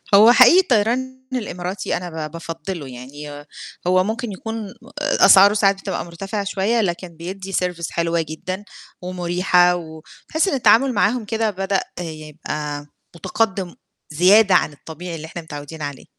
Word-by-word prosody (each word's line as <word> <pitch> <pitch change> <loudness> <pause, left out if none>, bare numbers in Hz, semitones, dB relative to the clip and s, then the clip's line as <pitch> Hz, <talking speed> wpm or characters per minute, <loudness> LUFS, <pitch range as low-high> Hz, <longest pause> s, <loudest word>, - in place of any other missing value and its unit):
هو 220 +4 +8
حقيقي 255 +9 +7
الطيران 260 - 0
الإماراتي 185 -5 -3
أنا 160 -3 -5
ب - - -16
بافضِّله 165 -1 -6
يعني 130 +4 -10
ي 145 0 -9 0.4
هو 185 0 +4
ممكن 220 +3 -3
يكون 220 +2 -5
أ 195 - -11 0.5
أسعاره 200 +2 +8
ساعات 200 -2 +2
بتبقى - - -4
مرتفعة 195 +5 -5
شويّة، 200 +4 0
لكن 180 -2 -2
بيدّي 190 +3 -7
service 180 -2 -2
حلوة 170 0 0
جدًا 175 +5 -6 0.4
ومُرِيحَة، 180 0 +2
و 160 -2 -8 0.3
تحسّ 315 +4 +1
إن - - 0
التعامل 250 +1 +4
معاهم 220 +2 +1
كده 225 +1 0
بدأ 195 0 -1 0.2
يبقي 150 -2 -6 0.3
مُتَقدِّم 190 +1 -2 0.3
زيادة، 190 +6 +5
عن 150 - +2
الطبيعي 165 +4 -8
اللي 160 -1 -7
إحنا 170 +1 -7
متعوّدين 155 0 -9
عليه. 145 -2 -6
185 Hz, 150 wpm, -21 LUFS, 160-210 Hz, 0.5 s, هو